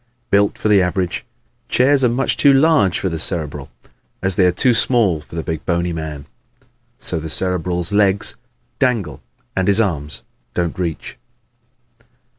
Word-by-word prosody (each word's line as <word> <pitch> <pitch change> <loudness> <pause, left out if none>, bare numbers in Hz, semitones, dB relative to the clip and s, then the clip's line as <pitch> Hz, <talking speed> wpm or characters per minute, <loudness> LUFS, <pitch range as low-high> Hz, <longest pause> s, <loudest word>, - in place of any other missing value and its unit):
Built 100 0 +2
for - - -2
the 105 -2 +5
average, 90 0 -2 0.4
chairs 135 +2 +3
are - - +5
as 120 - -1
much 135 +2 0
too 140 - +4
large 135 - +3
for 95 - -2
the 80 -3 -3
Cerebral 75 -5 -1 0.5
as 95 -1 0
they 90 -1 +4
are - - +3
too 120 +8 +3
small 115 -9 +2
for 75 - -13
the 80 - -3
big 80 -1 -4
bony 85 0 -1
man. 75 -3 -6 0.7
So 85 - +1
the 80 +1 -6
Cerebral's 90 0 +1
legs 100 -1 +2 0.4
dangle 120 -7 -1 0.3
and 95 -1 0
his 100 +1 +3
arms 75 - -1 0.3
don't 85 0 -2
reach. 85 -3 -4
90 Hz, 160 wpm, -18 LUFS, 80-105 Hz, 0.7 s, the